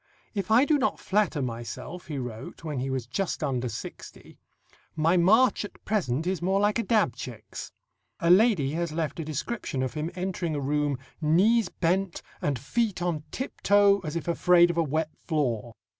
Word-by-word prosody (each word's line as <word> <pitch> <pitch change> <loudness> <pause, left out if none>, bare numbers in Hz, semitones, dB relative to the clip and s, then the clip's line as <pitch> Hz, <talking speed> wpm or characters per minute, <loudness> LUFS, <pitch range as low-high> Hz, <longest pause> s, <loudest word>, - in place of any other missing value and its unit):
"If 200 -3 -3
I 235 +5 +6
do 300 -1 +3
not 270 - 0
flatter 190 -8 +1
myself," 120 +8 -6
he 150 -3 -4
wrote 125 +2 -7
when 150 -5 -3
he 135 +2 -2
was 130 -3 -2
just 175 +10 -2
under 125 -2 -1
sixty, - - -9 0.6
"my 160 +3 +3
march 215 +8 +4
at 205 - -11
present 160 - 0
is 185 -1 -1
more 190 +2 +2
like 205 +3 +2
a - - +1
dab 205 - +2
chick's." 120 -3 -8 0.5
A 170 - +3
lady 185 - +4
has 170 +1 -2
left 155 -1 -3
a - - -2
description 150 - -3
of 130 - -3
him 155 +1 -3
entering 180 -3 -2
a - - -1
room, 145 0 0 0.2
"knees 190 +7 +3
bent, 185 +1 -1 0.2
and 145 -3 0
feet 205 - -1
on 160 -4 -2
tiptoe 205 - +3
as 160 -4 -6
if 170 - -3
afraid 175 0 +5
of 170 - -7
a 165 - +4
wet 155 +1 -2
floor." 120 - -2
165 Hz, 180 wpm, -27 LUFS, 140-195 Hz, 0.6 s, I